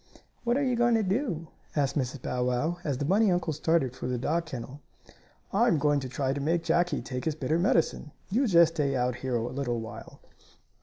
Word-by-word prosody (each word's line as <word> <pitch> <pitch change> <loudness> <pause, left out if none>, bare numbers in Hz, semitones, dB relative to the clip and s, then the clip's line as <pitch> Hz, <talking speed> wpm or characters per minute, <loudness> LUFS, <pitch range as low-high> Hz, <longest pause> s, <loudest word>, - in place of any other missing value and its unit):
"What 240 +1 +2
are 285 - +1
you 255 -2 +1
going 240 0 +3
to 220 - +2
do?" 185 - -1 0.3
asked 140 -3 +1
Mrs. 130 -2 -2
Bow 125 0 -1
Wow, 125 +8 0
as 145 -6 -1
the 145 - -2
bunny 200 +5 +3
uncle 175 -2 0
started 150 -4 +1
for - - -5
the 125 0 -1
dog 160 +7 -1
kennel. 130 0 -7 0.7
"I'm 225 -3 +4
going 145 0 +2
to 130 -2 -5
try 135 +1 -1
to 140 - -3
make 165 +3 +1
Jackie 175 +1 +1
take 125 -1 -5
his 160 -2 0
bitter 155 +2 0
medicine. 165 -4 +1 0.2
You 250 +6 +2
just 170 -4 +5
stay 145 -4 0
out 125 -1 0
here 130 -1 -2
a 115 0 -1
little 125 -2 -2
while." 115 0 -9
150 Hz, 210 wpm, -28 LUFS, 130-175 Hz, 0.7 s, just